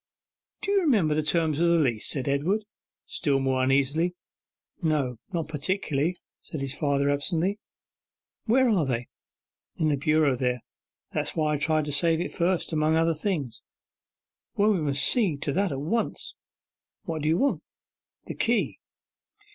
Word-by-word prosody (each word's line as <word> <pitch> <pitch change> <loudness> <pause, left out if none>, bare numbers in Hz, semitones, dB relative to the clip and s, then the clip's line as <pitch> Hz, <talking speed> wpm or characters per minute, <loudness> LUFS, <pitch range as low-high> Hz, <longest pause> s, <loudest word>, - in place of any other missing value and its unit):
'Do 400 - 0
you 400 -1 +4
remember 215 - +3
the 155 - +1
terms 155 -1 0
of 170 - +3
the 170 0 +4
leases?' 120 -9 +1
said 135 -3 -1
Edward, 170 +10 0 0.4
still 140 -2 0
more 130 -1 +1
uneasily. 140 +6 +1 0.7
'No, 145 -8 0
not 165 -4 -2
particularly,' 155 0 -1 0.3
said 155 - -6
his 135 -1 -2
father 140 -1 +1
absently. 170 +7 -1 0.9
'Where 255 +3 +4
are 200 -8 +3
they?' 120 -2 -2 0.7
'In 155 -2 +1
the 145 - +1
bureau 150 -1 +2
there; 125 -1 -1 0.5
that's - - -2
why 155 -1 +1
I - - +1
tried 155 0 +1
to 150 - -4
save 160 +3 +3
it 175 - -3
first, 175 -1 0
among 155 0 +2
other 165 +1 +3
things.' 155 - -3 0.9
'Well, 210 +2 +3
we 190 -5 +1
must 140 -2 +2
see 200 - +3
to 140 0 -2
that 195 -1 +1
at 135 - -3
once.' 225 +10 -1 0.7
'What 160 -2 -4
do 150 - 0
you 165 - +3
want?' 280 +6 +1 0.6
'The - - -5
key. - - +1
155 Hz, 160 wpm, -26 LUFS, 140-175 Hz, 0.9 s, you